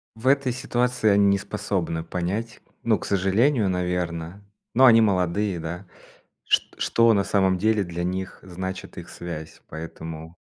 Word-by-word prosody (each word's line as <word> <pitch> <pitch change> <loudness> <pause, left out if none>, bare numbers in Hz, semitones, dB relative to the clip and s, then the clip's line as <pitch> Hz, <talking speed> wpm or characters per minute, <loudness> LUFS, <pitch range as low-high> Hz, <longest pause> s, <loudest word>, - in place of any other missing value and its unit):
В 110 +3 -9
этой 135 -1 +3
ситуации 125 -2 0
они 100 0 +5
не 100 0 +4
способны 90 -5 -3
понять. 95 +7 -3 0.2
Ну, - - +2
к - - -7
сожалению, 100 +4 +2
наверно, 90 0 -3 0.3
но 130 - +6
они 115 -3 +8
молодые, 95 -1 +1
да, 85 +4 -6 0.6
шт - - +1
что 115 0 +4
на 100 - +3
самом 95 -2 +2
деле 110 +1 +2
для 85 -1 -5
них 95 +1 -4
значит 95 +1 -6
их - - -8
связь, 80 -3 -8
поэтому 80 0 -8
95 Hz, 150 wpm, -24 LUFS, 85-110 Hz, 0.6 s, они